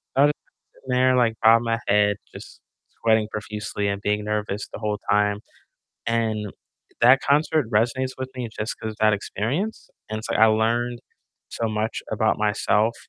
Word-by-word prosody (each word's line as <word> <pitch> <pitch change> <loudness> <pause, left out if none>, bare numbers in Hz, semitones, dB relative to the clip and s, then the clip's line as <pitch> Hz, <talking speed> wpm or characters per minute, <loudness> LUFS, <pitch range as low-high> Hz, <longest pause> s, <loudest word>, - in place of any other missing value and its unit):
I 135 - +5
was 145 - +4
just - - -41 0.2
sitting 130 -1 -5
there, 130 0 +4
like, 115 -2 +3
bobbing 115 +1 +6
my 115 0 0
head, 105 0 +3 0.2
just - - -11 0.4
sweating 110 -1 +3
profusely 105 -1 -4
and 100 0 -3
being 105 0 0
nervous 105 -1 -2
the - - -6
whole 105 -1 -2
time, 105 0 +2 0.7
and 110 -3 -1 0.5
that 130 +3 +6
concert 150 -1 +2
resonates 125 +4 +1
with 130 0 -4
me 125 -3 -4
just 105 +2 -3
'cause 110 -1 -5
that 110 -1 +5
experience, 135 - -3 0.2
and 110 - -2
it's, 110 - -7
like, - - 0
I 110 - +8
learned 120 +2 +1 0.5
so 115 -1 -2
much 110 +1 -2
about 110 0 +1
myself 105 +1 +1
110 Hz, 170 wpm, -23 LUFS, 105-120 Hz, 0.7 s, I